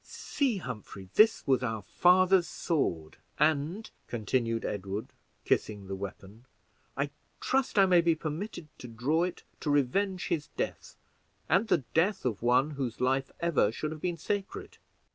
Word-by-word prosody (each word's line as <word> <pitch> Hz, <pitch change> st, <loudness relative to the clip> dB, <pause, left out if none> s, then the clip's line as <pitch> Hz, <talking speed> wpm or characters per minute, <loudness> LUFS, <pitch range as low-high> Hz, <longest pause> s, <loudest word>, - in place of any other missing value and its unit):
"See, 265 Hz, -8 st, -1 dB
Humphrey, 105 Hz, -, -8 dB
this 220 Hz, +1 st, +5 dB
was 130 Hz, -3 st, +3 dB
our 110 Hz, -5 st, -2 dB
father's 180 Hz, -, +4 dB
sword; 85 Hz, -, -2 dB, 0.2 s
and," 155 Hz, +7 st, +1 dB, 0.2 s
continued 115 Hz, 0 st, -1 dB
Edward, 100 Hz, +1 st, -4 dB, 0.4 s
kissing 105 Hz, -2 st, 0 dB
the 95 Hz, 0 st, -4 dB
weapon, 100 Hz, +4 st, -8 dB, 0.5 s
"I -, -, -1 dB, 0.3 s
trust 265 Hz, -4 st, 0 dB
I 195 Hz, -, +7 dB
may 180 Hz, -2 st, +5 dB
be 165 Hz, -1 st, +3 dB
permitted 160 Hz, +2 st, -5 dB
to 125 Hz, -, -8 dB
draw 125 Hz, +8 st, 0 dB
it 180 Hz, -, -6 dB, 0.2 s
to 150 Hz, -, -3 dB
revenge 175 Hz, +7 st, +1 dB
his 150 Hz, -3 st, -1 dB
death, -, -, -4 dB, 0.5 s
and 200 Hz, +5 st, +3 dB
the 165 Hz, -10 st, +2 dB
death 185 Hz, +3 st, +2 dB
of 115 Hz, -5 st, -1 dB
one 125 Hz, +5 st, +3 dB
whose 135 Hz, -5 st, -4 dB
life 135 Hz, +1 st, +1 dB
ever 165 Hz, -11 st, +2 dB
should 155 Hz, +6 st, -4 dB
have 155 Hz, -1 st, -7 dB
been 175 Hz, -2 st, -1 dB
sacred." 200 Hz, +4 st, -4 dB
150 Hz, 150 wpm, -30 LUFS, 115-180 Hz, 0.5 s, I